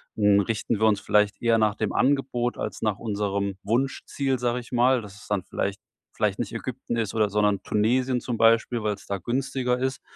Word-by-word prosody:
hm, 105 -1 +4
richten 110 +1 -1
wir 110 - +3
uns 105 -2 +3
vielleicht 105 0 +2
eher 115 -1 +3
nach 110 -1 +3
dem 110 -1 -2
Angebot 125 -3 +1
als - - -4
nach 105 -1 0
unserem 100 -2 -2
Wunschziel“, 135 +3 -1
sage 120 0 0
ich 120 - -12
mal, 125 +1 +3
dass 105 -2 -11
es - - -14
dann 100 -2 0
vielleicht 100 +1 -3 0.3
vielleicht 105 -2 0
nicht 120 - -3
Ägypten 120 0 -4
ist, 110 -3 -1
oder 110 -2 +2
sondern 105 -1 +1
Tunesien 125 +4 +1
zum 120 -1 -3
Beispiel, 115 0 +3
weil's 105 -2 -2
da 100 - -2
günstiger 125 +3 -1
ist. 130 +1 -2
115 Hz, 195 wpm, -25 LUFS, 105-125 Hz, 0.3 s, hm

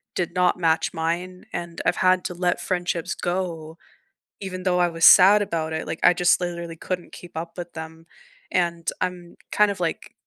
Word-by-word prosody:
did 175 -1 -2
not 180 -1 +2
match 165 -2 +1
mine, 175 +2 -3
and 170 -1 -5
I've - - +1
had 185 0 +3
to - - -3
let 175 0 -1
friendships 175 -2 -2
go 170 -3 -4 0.6
even 185 -2 -6
though 180 -1 +2
I 175 -1 +3
was 165 -1 +3
sad 200 +3 +8
about 165 -5 -2
it 160 - -3
Like, 165 - -4
I - - +7
just 180 +1 +2
literally 170 -1 -5
couldn't 180 +1 -5
keep 175 - -12
up 165 +1 -7
with 175 -1 -7
them, 160 0 -9 0.4
and 170 -2 -1
I'm 180 -1 -4
kind 210 -1 +3
of, 200 - -5
like, 170 -2 -3
175 Hz, 185 wpm, -23 LUFS, 165-180 Hz, 0.6 s, sad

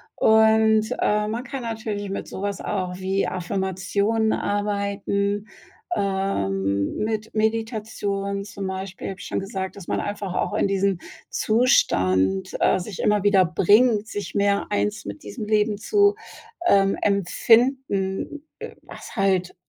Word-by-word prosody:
Und, 220 0 +4
äh, 210 0 +1
man 230 +3 -3
kann 270 -1 -6
natürlich 220 -3 -4
mit 195 - -4
sowas 200 +1 -4
auch 185 -3 -2
wie 190 +1 0
Affirmationen 190 +4 -1
arbeiten, 200 0 -1 0.5
ähm, 100 - -1
mit 215 0 -2
Meditation, 215 -3 -1
zum 200 -1 -6
Beispiel, 190 0 -5
habe 190 - -7
ich - - -8
schon - - -1
gesagt, 190 -1 -5
dass 195 -4 -11
man - - -1
einfach 205 -2 -4
auch 205 - -1
in 210 - +2
diesen 195 -2 +1 0.3
Zustand, 95 - +2
äh, - - +3
sich 185 +1 -7
immer 210 -1 +2
wieder 195 -2 +5
bringt, 210 +6 +3
sich 200 -5 -6
mehr 200 0 +2
eins 105 +1 -1
mit 100 0 -7
diesem 105 - -6
Leben 210 0 +1
zu, 405 - +3 0.5
ähm, 195 - +4
empfinden, 215 - +1 0.4
was - - -11
halt 190 -3 +1
200 Hz, 130 wpm, -23 LUFS, 190-215 Hz, 0.5 s, wieder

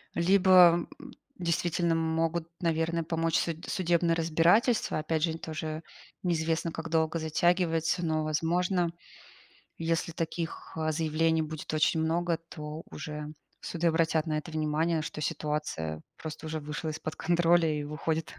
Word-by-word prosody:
Либо, 180 -1 +6
э, - - -12 0.4
действительно, 170 0 +1
могут, 165 +1 0
наверно, 165 0 0
помочь 165 0 0
суд 165 -1 -3
судебное 170 -2 +2
разбирательство. 170 +9 +3
Опять 155 0 -1
же, 165 -1 0
тоже 155 0 -5 0.4
неизвестно, 165 -1 0
как 160 0 -6
долго 160 0 +1
затягивается. 165 +1 +1
Но, 155 -1 0
возможно, 170 +3 +1 0.9
если 165 0 -1
таких, 165 0 -4
э, 155 0 0
заявлений 160 +1 +1
будет 155 0 -5
очень 155 +1 +2
много, 170 +1 +1
то 150 +1 -7
уже 150 -2 -6 0.3
суды 170 0 -1
обратят 160 -1 +2
на 155 -1 0
это 155 - -6
внимание, 155 +1 0
что 150 - -6
ситуация 150 - -2 0.2
просто 160 0 -7
уже 155 0 -3
вышла 150 +2 -4
из-под 155 +1 -5
контроля 170 0 +3
и 150 -1 -2
выходит 155 +2 -3
160 Hz, 135 wpm, -29 LUFS, 155-170 Hz, 0.9 s, Либо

